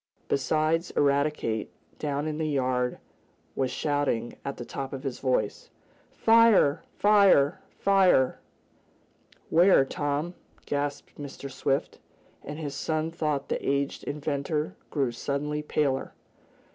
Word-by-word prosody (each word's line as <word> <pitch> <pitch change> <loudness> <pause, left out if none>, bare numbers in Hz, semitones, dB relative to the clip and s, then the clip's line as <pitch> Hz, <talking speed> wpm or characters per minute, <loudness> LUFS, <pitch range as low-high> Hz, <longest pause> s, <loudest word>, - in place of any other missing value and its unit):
Besides 155 +5 +1
Eradicate, 140 -6 +1 0.3
down 145 0 -2
in 155 0 -3
the 160 - 0
yard 125 -3 0 0.6
was 130 -1 0
shouting 145 -6 -1
at 140 - -5
the 120 - -6
top 135 +2 -5
of 135 - -6
his 135 -3 -4
voice: 125 -6 -1 0.5
"Fire! 225 -10 +5 0.2
Fire! 200 -9 +5 0.2
Fire!" 190 -9 +4 1.1
"Where, 170 -4 +6
Tom?" 145 +5 -2 0.3
gasped 145 0 -3
Mr. 140 -1 -7
Swift, 135 +1 -1 0.4
and 145 +1 -7
his 150 -3 -4
son 155 +3 -2
thought 150 -4 -2
the - - -2
aged 140 0 -1
inventor 150 +1 -2
grew 135 -5 0
suddenly 145 +5 -2
paler. 145 -3 -1
145 Hz, 115 wpm, -27 LUFS, 135-155 Hz, 1.1 s, Where